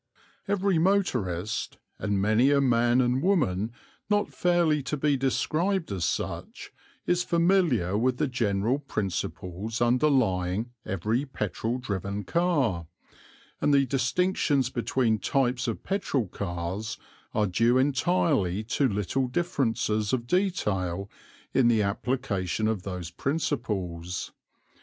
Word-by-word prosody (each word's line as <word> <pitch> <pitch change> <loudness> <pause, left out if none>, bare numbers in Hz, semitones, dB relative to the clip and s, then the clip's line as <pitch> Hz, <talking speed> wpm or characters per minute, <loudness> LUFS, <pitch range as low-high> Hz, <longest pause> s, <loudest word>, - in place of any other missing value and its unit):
Every 195 -3 +2
motorist, 125 - 0 0.2
and 100 -2 0
many 110 +6 +3
a 145 -1 +4
man 120 -1 +3
and 125 +1 +1
woman 120 - +1 0.4
not 205 0 +1
fairly 170 -4 +2
to 135 +3 -3
be 145 0 +2
described 155 - 0
as 90 -4 -1
such, - - -4 0.3
is 175 0 +2
familiar 170 - +2
with 125 +3 +1
the - - +1
general 120 -1 0
principles 105 -3 -4
underlying 120 -5 +2 0.2
every 105 +8 0
petrol 115 -1 -3
driven 100 -3 -3
car; 135 - +1 0.7
and - - +3
the 140 -1 +4
distinctions 135 0 +1
between 120 -2 +1
types 130 0 0
of 115 - -3
petrol 190 - -1
cars 90 +3 -4 0.4
are 105 -1 +3
due 115 +6 +3
entirely 130 - +1
to 125 +5 +1
little 105 +5 -1
differences 120 -8 0
of 120 -2 0
detail 100 - -1 0.4
in 130 -3 +4
the 115 -3 +3
application 105 -2 -1
of 110 -4 -1
those 90 -3 -6
principles. 95 - -2
120 Hz, 115 wpm, -27 LUFS, 100-145 Hz, 0.7 s, a